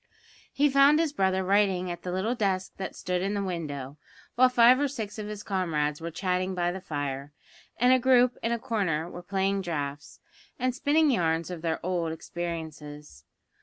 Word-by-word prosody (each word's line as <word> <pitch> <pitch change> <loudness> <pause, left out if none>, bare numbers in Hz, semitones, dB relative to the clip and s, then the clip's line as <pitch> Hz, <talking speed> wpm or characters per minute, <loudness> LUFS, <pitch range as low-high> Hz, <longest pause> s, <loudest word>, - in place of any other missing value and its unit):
He 290 +2 +3
found 275 +2 +5
his 320 -2 0
brother 190 -5 +1
writing 190 -2 +2
at 175 0 -7
the 180 - -5
little 190 +6 0
desk 195 -5 -1
that 190 - -5
stood 180 0 -2
in 200 +2 -1
the 200 - -1
window, 150 -7 -5 0.4
while 255 +1 +5
five 250 +1 +6
or 290 - +2
six 225 -6 -6
of 210 - -5
his 210 -1 -6
comrades 160 -6 -1
were 165 - -4
chatting 185 +2 -1
by 175 -1 0
the 190 +1 -6
fire, 145 -4 -4 0.4
and 250 +1 +5
a 260 - +4
group 250 -1 +4
in 230 - -1
a 235 - +1
corner 200 -10 -1
were 175 - -8
playing 195 +2 0
draughts, 145 -4 -5 0.4
and 255 0 0
spinning 295 +3 +3
yarns 165 -5 0
of 175 -3 -6
their 160 -1 -1
old 175 -3 -1
experiences. 155 - -7
185 Hz, 185 wpm, -27 LUFS, 165-230 Hz, 0.4 s, five